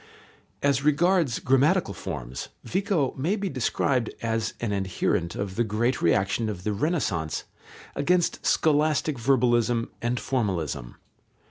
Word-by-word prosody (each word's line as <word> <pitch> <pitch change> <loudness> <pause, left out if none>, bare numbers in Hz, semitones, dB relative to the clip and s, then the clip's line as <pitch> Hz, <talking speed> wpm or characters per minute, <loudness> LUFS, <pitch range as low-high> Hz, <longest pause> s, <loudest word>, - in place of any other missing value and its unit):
As 140 -1 +2
regards 160 -2 +3
grammatical 145 +8 +2
forms, 65 -9 -6
Vico 185 -8 0
may 160 +10 0
be 200 -2 -2
described 130 -2 0
as 115 -1 -1
an 115 -3 -2
adherent 95 -2 -1
of 95 -2 -4
the 120 - +3
great 115 +4 0
reaction 95 +6 +2
of 90 -4 -5
the 105 - -1
Renaissance 100 - -1 0.5
against 175 +4 +1
scholastic 155 -2 +2
verbalism 120 -2 +2
and 120 +1 0
formalism. 85 - -2
120 Hz, 120 wpm, -26 LUFS, 100-150 Hz, 0.5 s, regards